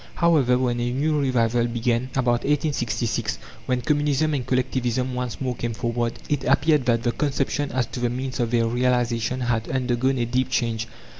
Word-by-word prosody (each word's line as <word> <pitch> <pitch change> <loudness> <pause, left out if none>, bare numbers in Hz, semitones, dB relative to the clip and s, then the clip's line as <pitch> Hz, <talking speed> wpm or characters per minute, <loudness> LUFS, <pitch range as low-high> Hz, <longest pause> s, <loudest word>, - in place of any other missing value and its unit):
However, 150 -8 +3
when 125 -2 0
a 120 0 -1
new 150 +4 +1
revival 120 -3 +2
began, 120 +1 0
about 120 -2 +2
1866, 125 -6 -1 0.3
when 125 -1 0
Communism 150 +1 +1
and 135 -3 -1
Collectivism 130 -1 0
once 125 -1 -3
more 130 -2 -1
came 115 -1 -3
forward, 120 0 -1
it 145 -3 -1
appeared 150 -3 +3
that 115 -1 +2
the 120 - +2
conception 145 +1 -1
as 130 -2 0
to 125 - -7
the 120 0 +1
means 130 +2 -4
of 120 -2 +1
their 115 -1 +2
realization 120 0 0
had 115 -2 -1
undergone 130 0 0
a 120 - +1
deep 125 +2 0
change. 115 -1 -1
125 Hz, 175 wpm, -24 LUFS, 120-135 Hz, 0.3 s, However